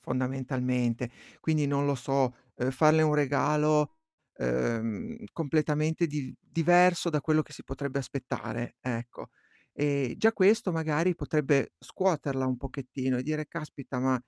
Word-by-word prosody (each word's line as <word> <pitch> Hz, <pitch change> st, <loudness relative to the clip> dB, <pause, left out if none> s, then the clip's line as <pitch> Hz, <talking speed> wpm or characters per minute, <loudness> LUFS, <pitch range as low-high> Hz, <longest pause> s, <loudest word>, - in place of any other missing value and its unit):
fondamentalmente. 125 Hz, -2 st, -1 dB, 0.3 s
Quindi 155 Hz, -2 st, +1 dB
non 140 Hz, 0 st, +1 dB
lo 140 Hz, -1 st, +1 dB
so, 130 Hz, 0 st, 0 dB, 0.2 s
uhm, 125 Hz, +2 st, 0 dB
farle 155 Hz, +3 st, +5 dB
un 150 Hz, -1 st, +3 dB
regalo, 150 Hz, -, +2 dB, 0.4 s
uhm, 110 Hz, -, -2 dB
completamente 155 Hz, +1 st, +1 dB
div 145 Hz, -4 st, -4 dB
diverso 175 Hz, +1 st, +4 dB
da 150 Hz, -2 st, +1 dB
quello 155 Hz, 0 st, +2 dB
che 145 Hz, -, -16 dB
si -, -, -11 dB
potrebbe 140 Hz, 0 st, -4 dB
aspettare, 120 Hz, -3 st, -5 dB
ecco. 120 Hz, -1 st, -6 dB, 0.4 s
E 140 Hz, -4 st, 0 dB
già 225 Hz, +1 st, +5 dB
questo 205 Hz, +1 st, +4 dB
magari 160 Hz, +2 st, +1 dB
potrebbe 150 Hz, -4 st, +1 dB
scuoterla 145 Hz, -8 st, -1 dB
un 130 Hz, -1 st, 0 dB
pochettino 130 Hz, -1 st, -3 dB
e -, -, -2 dB
dire: 155 Hz, +2 st, -2 dB
"Caspita, 145 Hz, -5 st, -6 dB
ma, 130 Hz, 0 st, +2 dB
140 Hz, 135 wpm, -29 LUFS, 130-155 Hz, 0.4 s, farle